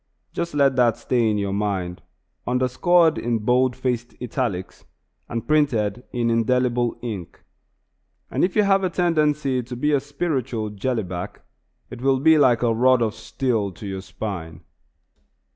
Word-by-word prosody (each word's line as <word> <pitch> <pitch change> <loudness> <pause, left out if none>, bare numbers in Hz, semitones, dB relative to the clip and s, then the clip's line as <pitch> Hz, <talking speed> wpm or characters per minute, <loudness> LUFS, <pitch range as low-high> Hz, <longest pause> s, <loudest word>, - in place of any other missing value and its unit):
Just 170 -3 -3
let 140 -2 +3
that 120 -3 +4
thought - - -22
stay 120 -3 +1
in 105 - 0
your 100 -1 -2
mind, 95 -4 -2 0.5
underscored 155 +7 +3
in 120 -1 0
bold 125 +3 +2
faced 125 -2 -3
italics, 115 -7 -3 0.5
and 115 -1 -4
printed 120 -8 +1
in 120 -2 0
indelible 120 +1 +1
ink; 100 -8 -6 0.9
and - - 0
if 180 - +1
you 210 - +4
have 195 -1 +3
a 185 - +1
tendency 150 -7 +1
to 125 +1 -8
be 150 +5 0
a 145 - +3
spiritual 135 -7 -3
"jelly 110 +3 -2
back," 90 -1 -7 0.5
it - - -8
will 135 0 +2
be 160 +2 +5
like 125 -4 +4
a 115 -1 +3
rod 125 +1 +4
of 110 -2 -1
steel 110 -2 -2
to 105 - -10
your 95 -1 -4
spine. 95 -4 -6
125 Hz, 160 wpm, -23 LUFS, 110-135 Hz, 0.9 s, be